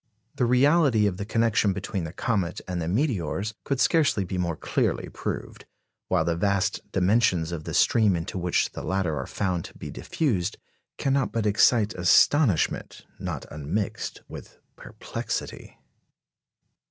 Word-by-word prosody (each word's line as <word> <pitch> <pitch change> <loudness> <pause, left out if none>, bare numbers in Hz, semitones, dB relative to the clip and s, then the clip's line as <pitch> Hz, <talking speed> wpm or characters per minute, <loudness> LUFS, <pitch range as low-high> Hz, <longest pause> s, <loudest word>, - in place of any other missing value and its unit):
The 125 - 0
reality 130 -2 +4
of 95 -3 0
the 100 - -5
connection 110 -2 +2
between 95 -2 -4
the 80 - -6
comet 95 -5 -1
and 90 -2 -3
the 80 - -3
meteors 105 - -1
could 135 -2 -2
scarcely 145 -10 +3
be 90 0 -4
more 85 -2 -1
clearly - - -1
proved; - - -6 0.4
while 90 -4 +1
the 85 0 0
vast 100 +2 0
dimensions 90 -4 +2
of 80 -3 -5
the - - -5
stream 110 -5 +4
into 90 +4 -4
which 90 -1 +1
the - - -7
latter 95 -5 -1
are - - -4
found 90 -4 -2
to - - -12
be - - -7
diffused 105 - -1 0.4
cannot 135 -3 +1
but 115 -2 -1
excite 105 +1 +3
astonishment 95 - +2
not - - -4
unmixed 80 +8 -4
with - - -11 0.2
perplexity. - - -6
100 Hz, 145 wpm, -26 LUFS, 90-115 Hz, 0.4 s, reality